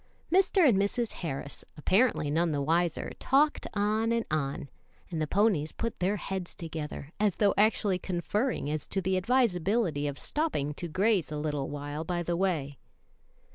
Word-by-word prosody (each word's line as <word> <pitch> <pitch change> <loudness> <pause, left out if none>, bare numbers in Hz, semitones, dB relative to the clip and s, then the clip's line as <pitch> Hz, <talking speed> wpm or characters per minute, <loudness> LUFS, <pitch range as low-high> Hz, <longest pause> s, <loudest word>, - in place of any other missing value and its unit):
Mr. 375 -2 +5
and 210 -7 +4
Mrs. 220 +3 0
Harris, 145 -4 -4
apparently 185 - +2
none 165 +2 +2
the 145 - 0
wiser, 165 +2 0
talked 295 +3 +2
on 215 +2 +1
and 230 -1 +1
on, 140 -2 -1 0.4
and 160 -2 -2
the 155 - 0
ponies 185 -6 +2
put 230 -1 -4
their 190 +3 +1
heads 190 -2 -4
together, 155 -3 -6
as 210 -3 +2
though 205 -2 +3
actually 205 -2 +2
conferring 190 - -1
as 150 0 -3
to 195 - -2
the 190 0 0
advisability 190 - +1
of 145 -1 -4
stopping 290 - -1
to 175 +4 -5
graze 185 -1 +1
a 150 - -3
little 150 -2 -2
while 145 +1 -4
by 175 +1 -2
the 175 0 -1
way. 160 -7 -1
180 Hz, 165 wpm, -29 LUFS, 155-215 Hz, 0.4 s, Mr